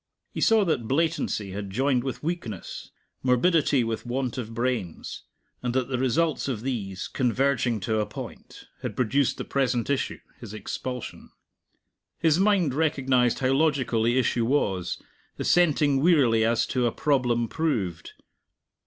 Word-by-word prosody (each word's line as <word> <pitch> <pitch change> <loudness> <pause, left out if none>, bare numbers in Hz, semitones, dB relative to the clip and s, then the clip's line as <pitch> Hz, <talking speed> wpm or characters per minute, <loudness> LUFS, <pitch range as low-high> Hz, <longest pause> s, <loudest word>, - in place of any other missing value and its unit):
He - - -5
saw 220 -2 +4
that 125 -10 0
blatancy 145 - 0
had 100 +1 -5
joined 130 +4 +1
with 130 +1 -5
weakness, 150 - -5 0.3
morbidity 140 +1 +3
with 115 -1 -3
want 125 0 -2
of 115 -2 -5
brains; 115 -7 -3 0.4
and 125 0 -2
that 130 0 0
the 130 -2 -1
results 150 +6 +1
of 120 -5 -3
these, 100 -8 -3
converging 125 -2 +1
to 110 +3 0
a 105 - -1
point, - - -9 0.2
had - - -4
produced 130 +1 +1
the - - -5
present 125 -2 0
issue, 140 - -1 0.2
his 110 -3 -8
expulsion. 125 +4 -6 0.9
His 160 0 +3
mind 190 -8 +3
recognized 135 -5 +2
how 130 0 +2
logical 140 -6 +1
the 120 +3 +2
issue 120 -2 +1
was, 95 -10 0 0.4
assenting 150 -5 +3
wearily 135 -9 +4
as 115 +1 +2
to 125 -2 0
a - - 0
problem 125 -5 +1
proved. 105 - -2
125 Hz, 145 wpm, -26 LUFS, 115-140 Hz, 0.9 s, saw